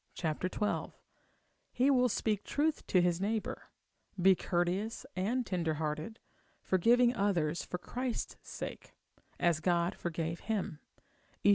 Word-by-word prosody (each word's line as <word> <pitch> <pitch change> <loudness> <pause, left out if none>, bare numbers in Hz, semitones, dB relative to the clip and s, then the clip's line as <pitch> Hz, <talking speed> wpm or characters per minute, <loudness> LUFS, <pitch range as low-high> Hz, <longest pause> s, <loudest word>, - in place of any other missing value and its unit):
xii; 160 -3 +1 1.4
he 260 +3 +3
will 250 -2 +4
speak 215 -4 0
truth 305 +2 0
to 185 - +4
his 175 0 +1
neighbour, 215 +2 -2 0.5
be 190 +2 +7
courteous 180 +5 -1
and 230 +7 0
tender 170 -5 0
hearted, 155 +7 -3 0.5
forgiving 240 +6 +4
others 175 -6 +1
for 180 - -4
Christ's 245 +6 -3
sake, - - -7 0.4
as 170 -2 +3
God 170 +2 +2
forgave 165 -1 -3
him, 205 -8 -2 0.7
Eph. - - +7
185 Hz, 120 wpm, -33 LUFS, 170-225 Hz, 1.4 s, be